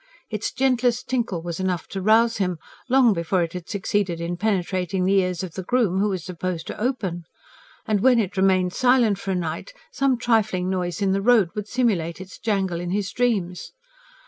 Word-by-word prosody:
Its 215 0 -2
gentlest 250 -2 +1
tinkle 230 -10 -1
was 170 0 -5
enough 185 -2 -2
to 195 - -5
rouse 225 +3 +4
him 180 -3 -1 0.3
long 255 -3 +5
before 175 +1 0
it 165 - -5
had 180 -2 -7
succeeded 195 -3 -1
in 170 +1 -3
penetrating 185 -2 -1
the 195 +1 +4
ears 180 -1 -2
of 180 -4 -6
the 190 - -4
groom, 200 -2 +1
who 210 +1 +2
was 185 -4 -3
supposed 180 -2 -4
to - - -7
open. 200 -9 -2 0.6
And 215 -2 +1
when 255 +1 +5
it 200 -4 0
remained 185 -1 +2
silent 245 -6 +3
for 195 - -6
a 190 - +1
night, 170 - -4 0.2
some 275 - +1
trifling 220 -6 +1
noise 180 +1 -2
in 195 - +2
the 195 +1 +1
road 215 -5 +4
would 210 -1 -5
simulate 200 -10 0
its 190 0 -10
jangle 195 -6 -1
in 175 - -4
his 200 +1 -1
dreams. 200 -8 -1
195 Hz, 195 wpm, -23 LUFS, 180-230 Hz, 0.6 s, long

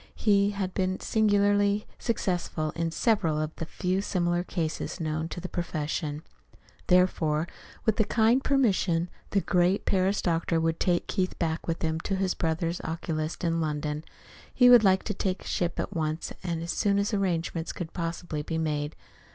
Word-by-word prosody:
He 200 -2 +3
had 195 -2 -3
been 185 0 0
singularly 205 -1 +2
successful 175 -8 -1
in 165 +1 -2
several 165 -3 +1
of 155 +1 -3
the 165 - -4
few 185 +3 -1
similar 175 -3 0
cases 165 -3 -3
known 155 0 -2
to - - -5
the 180 - -5
profession. 155 -3 -3 0.6
Therefore, 170 -3 +3 0.4
with 220 - +2
their 220 - +2
kind 235 +4 +3
permission, 190 -10 +2 0.2
the 200 - +2
great 180 +2 +2
Paris 195 +1 +2
doctor 165 -1 +1
would 165 0 0
take 175 -1 +1
Keith 185 -2 -1
back 165 -1 -2
with 165 0 -2
him 160 0 0
to 195 +3 -2
his 190 -1 0
brother 165 0 -1
oculist 160 -1 -3
in 165 -1 +1
London. 150 0 -2 0.5
He 250 -1 +6
would 240 -3 +9
like 190 -1 +4
to 210 - -2
take 185 -1 -2
ship 175 -1 -2
at 200 - -3
once, 155 0 -2
as 170 -1 -2
soon 200 -1 +1
as 200 +2 0
arrangements 170 -4 -1
could 170 -3 -6
possibly 165 -2 -3
be 160 +2 -3
made. 150 -1 -1
175 Hz, 165 wpm, -28 LUFS, 160-195 Hz, 0.6 s, would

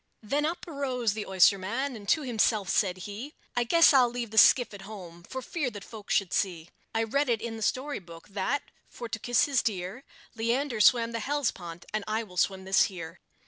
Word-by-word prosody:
Then 285 +8 0
up 340 +2 -5
arose 260 -8 -1
the 215 -1 -5
oysterman, 200 +8 +2
and 205 -2 -8
to 310 - +3
himself 220 -5 +1
said 190 -4 +1
he, 225 +9 -7 0.2
"I 245 - +2
guess 330 +6 +6
I'll 255 -3 +5
leave 235 -2 -5
the 220 - -7
skiff 245 -1 +6
at 200 - -9
home, 185 -4 -10
for 260 +9 -7
fear 300 -5 -2
that 205 -4 -9
folks 215 -1 -4
should 190 -3 0
see; 175 -4 -1 0.3
I 225 - +2
read 280 +5 0
it 230 -2 +2
in 230 0 -5
the 220 - -8
story 270 +7 -1
book, 170 -2 -13
that, 205 +8 -1 0.3
for 240 - -7
to 225 0 -5
kiss 245 +2 +2
his 280 -3 +1
dear, 195 +4 -3 0.3
Leander 235 +1 0
swam 230 0 +5
the 230 - -3
Hellespont, 210 -10 -3
and 215 -1 -1
I 220 +1 -1
will 180 -4 -13
swim 190 +1 0
this 190 +1 +4
here." 170 -2 -8
225 Hz, 210 wpm, -28 LUFS, 195-255 Hz, 0.3 s, guess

